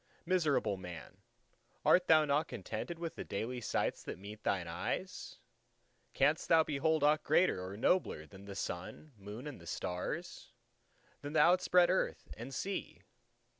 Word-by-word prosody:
—Miserable 150 - +2
man! 90 -5 -9 0.7
art 180 0 +5
thou 155 -1 +6
not 145 +2 +1
contented 170 - -5
with 165 -1 -4
the - - -6
daily 120 +5 -4
sights - - -1
that - - -6
meet 105 +3 -10
thine 90 -3 0
eyes? 135 - -4 0.8
canst - - +2
thou 160 -1 +6
behold 155 +1 +1
aught 150 +1 +4
greater 155 - +3
or 95 +2 -6
nobler 115 - +1
than 95 +6 -13
the 100 -1 -8
Sun, 90 - -5
Moon, 105 +5 -9
and 90 - -8
Stars; 115 - -4 0.7
than 145 +1 -6
the - - +3
outspread 180 0 +5
Earth 190 - -1
and 120 +4 -7
Sea? 190 +10 -4
140 Hz, 145 wpm, -34 LUFS, 100-165 Hz, 0.8 s, thou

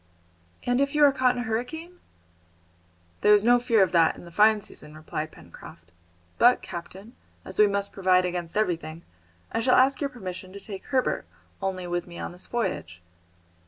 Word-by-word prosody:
"And 245 +2 +1
if 280 +1 0
you 300 - +4
are 285 - +6
caught 255 -2 +2
in 245 - -2
a - - -7
hurricane?" 320 +11 -4 1.2
"There 210 0 +7
is 205 - +2
no 245 +1 +6
fear 235 -4 +3
of 185 - 0
that 165 -2 +4
in - - -12
the 170 - -12
fine 215 +3 +5
season," 150 -5 -9
replied 155 0 -5
Pencroft. 85 +1 -14 0.5
"But, 245 +1 +5
captain, 190 +7 -9 0.3
as - - -8
we 210 - +7
must 200 0 -2
provide 185 -1 +3
against 175 0 -3
everything, 170 -5 -2 0.5
I 225 - -1
shall 250 +2 +3
ask 265 +3 +4
your 280 - 0
permission 185 -6 -8
to 200 - -8
take 195 -1 -9
Herbert 260 -2 0 0.3
only 190 -2 -3
with 175 0 -3
me 170 -1 -10
on - - -5
this 180 +1 -8
voyage." 90 - -3
200 Hz, 185 wpm, -26 LUFS, 175-245 Hz, 1.2 s, There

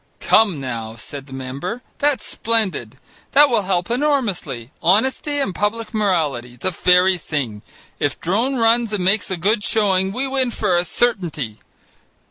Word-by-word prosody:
"Come 205 -9 +3
now," 115 -4 -5
said 135 +5 -9
the 135 - -11
member, 140 - -5 0.2
"that's 285 -5 +1
splendid: 200 - -1 0.4
that 290 +1 +7
will 230 -3 +3
help 185 +1 -1
enormously. 235 - -1
Honesty 265 - +2
and 275 -9 -1
public 215 +4 -2
morality! 155 - 0
The 155 +10 -2
very 180 +1 +4
thing! 130 -10 -4 0.4
If 145 -2 -1
Drone 225 +10 0
runs 230 -1 +2
and 190 -3 -1
makes 195 +2 +2
a 185 - -2
good 205 +5 +1
showing, 190 -3 +1
we 255 +6 -2
win 265 -2 +1
for 205 -5 0
a 175 +1 +1
certainty. 165 - -1
190 Hz, 150 wpm, -20 LUFS, 145-230 Hz, 0.4 s, that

